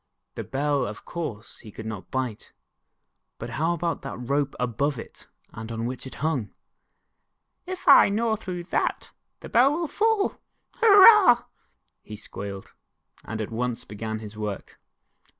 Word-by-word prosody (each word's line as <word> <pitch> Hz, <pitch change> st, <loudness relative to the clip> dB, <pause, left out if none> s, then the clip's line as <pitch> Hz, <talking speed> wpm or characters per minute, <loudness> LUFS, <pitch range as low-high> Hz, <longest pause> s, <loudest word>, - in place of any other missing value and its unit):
The -, -, -5 dB
Bell, 145 Hz, -1 st, -1 dB
of 105 Hz, 0 st, -9 dB
course, 120 Hz, -10 st, -6 dB
he 110 Hz, -, -12 dB
could 110 Hz, -, -9 dB
not 110 Hz, -3 st, -7 dB
bite, 130 Hz, -5 st, -4 dB, 0.8 s
but -, -, -7 dB
how 165 Hz, +3 st, 0 dB
about 170 Hz, 0 st, -2 dB
that 135 Hz, -, -6 dB
rope 140 Hz, +3 st, -1 dB
above 125 Hz, +4 st, -1 dB
it -, -, -11 dB, 0.3 s
and 110 Hz, +1 st, -7 dB
on 115 Hz, 0 st, -3 dB
which 130 Hz, +2 st, -5 dB
it -, -, -9 dB
hunor? 140 Hz, -9 st, -1 dB, 0.6 s
" -, -, -52 dB
If 370 Hz, 0 st, -7 dB
I -, -, +8 dB
gnaw 220 Hz, +2 st, +1 dB
through 185 Hz, -5 st, -6 dB
that, -, -, -1 dB, 0.3 s
the -, -, -9 dB
Bell 250 Hz, +4 st, +5 dB
will 335 Hz, +1 st, -2 dB
fall 435 Hz, +3 st, 0 dB, 0.4 s
hurrah," 405 Hz, -, +8 dB, 0.6 s
he 105 Hz, -, -9 dB
squealed, 100 Hz, -2 st, -8 dB, 0.5 s
and 110 Hz, -, -6 dB
at 110 Hz, -, -5 dB
once 120 Hz, +1 st, -3 dB
began 110 Hz, +1 st, -5 dB
his 110 Hz, -1 st, -9 dB
work. 105 Hz, -2 st, -6 dB
130 Hz, 150 wpm, -25 LUFS, -, 0.8 s, I